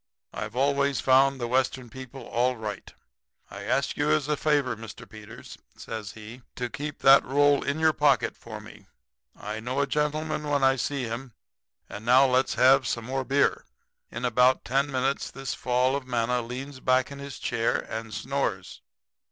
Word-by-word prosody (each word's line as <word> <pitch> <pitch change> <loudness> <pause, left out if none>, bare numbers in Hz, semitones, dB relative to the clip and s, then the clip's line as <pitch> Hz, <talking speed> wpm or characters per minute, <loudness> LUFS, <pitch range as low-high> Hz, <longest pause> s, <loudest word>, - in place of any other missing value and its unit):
I've 105 +2 -6
always 140 +1 +1
found 135 +1 +4
the 120 - -2
Western 130 0 0
people 130 +2 -10
all 125 +2 0
right. 105 -3 -6 0.6
I - - -8
ask - - 0
you - - +1
as 75 - +2
a 150 - +1
favor, 145 -5 +1
Mr. 110 0 -10
Peters,' 110 +1 -12 0.2
says 110 -3 -7
he, 110 +3 -11
'to 120 -1 -4
keep 145 +1 -6
that 135 +1 +8
roll 145 +1 +3
in 140 +2 -2
your 160 0 +4
pocket 145 -3 +2
for 110 -2 -9
me. 105 -1 -14 0.5
I 105 +1 -6
know 125 +4 -3
a 140 - +3
gentleman 150 +2 -2
when 145 -1 +1
I 135 0 +5
see 135 +1 -2
him. 120 +2 -5 0.5
And 105 +2 -8
now 125 +3 +6
let's 130 0 +1
have 130 0 +5
some 115 -2 -2
more 135 +2 -2
beer.' 140 +2 +1 0.5
"In 120 +2 -5
about 125 +2 +3
ten 140 +3 0
minutes 135 +1 -1
this 135 0 -5
fall 125 +2 +1
of 140 -2 -5
manna 120 0 0
leans 130 +3 -7
back 130 +1 +1
in 140 - -8
his 140 -1 -8
chair 115 0 0
and 110 0 -6
snores. 115 -5 -3
130 Hz, 175 wpm, -26 LUFS, 115-140 Hz, 0.6 s, that